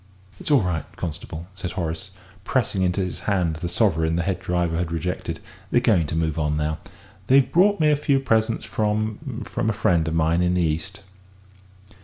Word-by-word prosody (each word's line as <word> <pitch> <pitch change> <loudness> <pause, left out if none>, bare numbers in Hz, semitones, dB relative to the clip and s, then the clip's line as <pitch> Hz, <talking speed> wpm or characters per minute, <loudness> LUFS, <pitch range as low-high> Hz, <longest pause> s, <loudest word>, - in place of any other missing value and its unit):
"It's - - -5
all 140 -7 +5
right, 90 -4 -1
constable," 80 0 -6
said 95 -2 -5
Horace, 80 -3 -3 0.3
pressing 95 - 0
into 90 +1 +1
his 90 -1 -3
hand 90 -6 +1
the 85 +2 -4
sovereign 80 -5 +2
the 85 - 0
head 95 0 -1
driver 90 -3 0
had 85 -1 -2
rejected; 85 -1 -3 0.3
"they're - - +4
going 105 -10 +3
to 80 - -3
move 80 -1 0
on 75 -1 0
now. 75 +1 -1 0.5
They've 135 +1 +5
brought 200 +3 +4
me 155 -1 +4
a - - +4
few 140 -1 +2
presents 110 -3 +1
from 110 +5 -2
from 110 - -1
a - - +1
friend 85 -6 +2
of 80 - -1
mine 80 +2 +2
in 90 0 +2
the 90 - +2
East." 85 +5 -2
90 Hz, 190 wpm, -23 LUFS, 80-110 Hz, 0.5 s, all